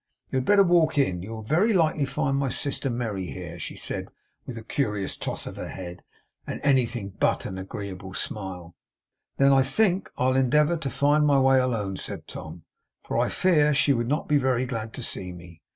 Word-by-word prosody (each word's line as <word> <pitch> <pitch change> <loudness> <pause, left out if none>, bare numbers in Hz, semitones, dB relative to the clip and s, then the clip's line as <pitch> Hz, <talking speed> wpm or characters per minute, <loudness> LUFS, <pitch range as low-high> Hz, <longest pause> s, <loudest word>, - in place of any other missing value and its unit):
You - - 0
had 130 - 0
better 205 -1 +6
walk 170 -4 +3
in. 95 -11 +2
You 95 - -8
will 110 - -7
very 175 - +2
likely 155 -5 +2
find 135 0 -1
my 140 -1 0
sister 135 +2 -2
Merry 110 -6 -3
here,' 85 -2 -7
she - - -6
said - - -5 0.4
with 120 - -6
a 110 - -7
curious 105 -6 -1
toss - - -4
of - - -7
her - - -5
head, 90 -1 -8 0.5
and - - -4
anything 120 -7 +1
but - - +1
an 95 - -5
agreeable 95 -1 -7
smile. 90 -4 -4 0.6
'Then, 140 0 +5
I 135 - +6
think, 185 +7 +1
I'll 130 +1 +2
endeavour 150 +6 +3
to 140 -4 -3
find 145 +3 +3
my 140 -2 +4
way 135 0 +5
alone,' 110 -7 -1
said - - -5
Tom, 80 +2 -8 0.4
'for - - -5
I - - +2
fear 150 -5 +3
she 140 0 +4
would 120 -2 -1
not 150 +4 -1
be 150 - +4
very 130 -2 +1
glad 115 -3 -4
to 125 - -6
see 90 -4 -4
me. 85 -2 -13
130 Hz, 200 wpm, -26 LUFS, 95-145 Hz, 0.6 s, better